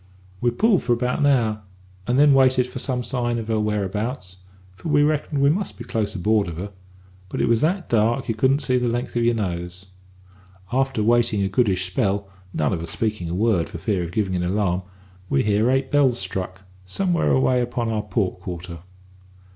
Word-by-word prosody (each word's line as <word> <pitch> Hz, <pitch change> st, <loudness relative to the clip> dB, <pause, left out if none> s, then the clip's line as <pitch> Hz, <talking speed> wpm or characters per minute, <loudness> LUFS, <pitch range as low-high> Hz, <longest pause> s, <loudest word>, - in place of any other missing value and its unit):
"We 120 Hz, -, +2 dB
pulled 195 Hz, -, +2 dB
for 120 Hz, 0 st, +1 dB
about 125 Hz, +3 st, -1 dB
an 145 Hz, -, +3 dB
hour, 115 Hz, -6 st, +2 dB, 0.5 s
and 125 Hz, -, +1 dB
then 145 Hz, 0 st, +6 dB
waited 130 Hz, -2 st, +4 dB
for 125 Hz, 0 st, -7 dB
some 125 Hz, -1 st, -2 dB
sign 120 Hz, -1 st, -1 dB
of 115 Hz, -1 st, -5 dB
her 110 Hz, -1 st, +1 dB
whereabouts 105 Hz, -1 st, -2 dB, 0.4 s
for 95 Hz, -, -7 dB
we 145 Hz, -1 st, +4 dB
reckoned 150 Hz, -1 st, 0 dB
we 140 Hz, -, +5 dB
must 195 Hz, +5 st, -3 dB
be 120 Hz, -, -7 dB
close 110 Hz, -3 st, -2 dB
aboard 105 Hz, +2 st, +1 dB
of 85 Hz, -2 st, -6 dB
her 100 Hz, +3 st, -5 dB, 0.6 s
but -, -, -4 dB
it -, -, +2 dB
was 115 Hz, -1 st, +3 dB
that 175 Hz, +3 st, 0 dB
dark 115 Hz, +1 st, +1 dB
you 115 Hz, -, 0 dB
couldn't 130 Hz, +6 st, +2 dB
see 130 Hz, -1 st, +2 dB
the 125 Hz, -, 0 dB
length 120 Hz, +1 st, -2 dB
of 120 Hz, -, +1 dB
your 120 Hz, 0 st, +3 dB
nose. 90 Hz, -2 st, -4 dB, 0.9 s
After 130 Hz, -4 st, +1 dB
waiting 115 Hz, -2 st, +2 dB
a 95 Hz, -, 0 dB
goodish 95 Hz, -4 st, +1 dB
spell 100 Hz, +1 st, -1 dB, 0.2 s
none 75 Hz, -5 st, 0 dB
of 85 Hz, -, -2 dB
us 85 Hz, -, -5 dB
speaking 105 Hz, -6 st, -2 dB
a 85 Hz, -, -2 dB
word 100 Hz, -4 st, +1 dB
for -, -, -7 dB
fear 90 Hz, +1 st, -1 dB
of 85 Hz, -, -6 dB
giving 95 Hz, -1 st, -1 dB
an 90 Hz, -, 0 dB
alarm 90 Hz, 0 st, 0 dB, 0.5 s
we 70 Hz, -, +2 dB
hears 105 Hz, +2 st, +2 dB
eight 135 Hz, 0 st, +1 dB
bells 135 Hz, -4 st, +3 dB
struck, 95 Hz, -1 st, -4 dB, 0.2 s
somewhere 175 Hz, -, 0 dB
away 130 Hz, -1 st, +3 dB
upon 120 Hz, -1 st, -2 dB
our 110 Hz, -1 st, 0 dB
port 100 Hz, -2 st, -2 dB
quarter. 90 Hz, -2 st, -7 dB
110 Hz, 205 wpm, -23 LUFS, 95-125 Hz, 0.9 s, then